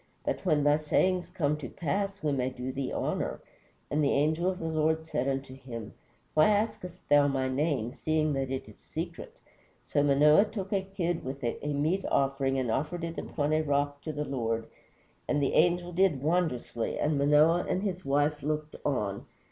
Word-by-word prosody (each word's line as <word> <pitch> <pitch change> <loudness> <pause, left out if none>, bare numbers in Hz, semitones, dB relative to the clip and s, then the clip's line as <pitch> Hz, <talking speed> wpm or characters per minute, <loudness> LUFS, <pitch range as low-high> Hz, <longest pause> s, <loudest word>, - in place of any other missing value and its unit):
that - - -2
when 150 -1 +2
thy 145 +1 +4
sayings 180 +4 +1
come 150 -2 0
to 145 -5 -7
pass 195 +4 -2
we 150 - +1
may 130 -2 0
do 130 0 -5
thee 135 0 -3
honor. - - -2 0.5
And 150 +1 +2
the 140 - +3
angel 160 +5 +2
of 185 - -3
the 165 - -5
Lord 160 0 +1
said 135 -5 -1
unto 135 -1 -2
him, 120 -5 -8 0.4
Why 155 0 +5
askest 205 -4 -1
thou 145 0 +5
my 135 -2 0
name, 130 -3 0
seeing 155 -1 0
that 135 -1 -1
it 130 0 -4
is - - -15
secret? - - -6 0.5
So 145 - +1
Manoah 150 +6 +5
took 210 -2 -5
a 195 - +2
kid 175 -3 -2
with 130 +1 -6
a 120 - -2
meat 155 +7 0
offering 135 -1 +1
and 125 -3 0
offered 155 +7 -2
it 165 0 -4
upon 150 0 -1
a 155 - +3
rock 145 -1 0
to 155 - -4
the 150 0 -3
Lord; 115 -4 -2 0.6
and 145 - +1
the 140 - +1
angel 175 +1 +3
did 175 -6 +2
wonderously, 155 -8 0
and 150 0 +1
Manoah 150 +4 +4
and 190 - 0
his 185 -3 -2
wife 145 +1 +1
looked 150 +1 -3
on. 105 -8 -2
150 Hz, 190 wpm, -29 LUFS, 135-170 Hz, 0.6 s, Why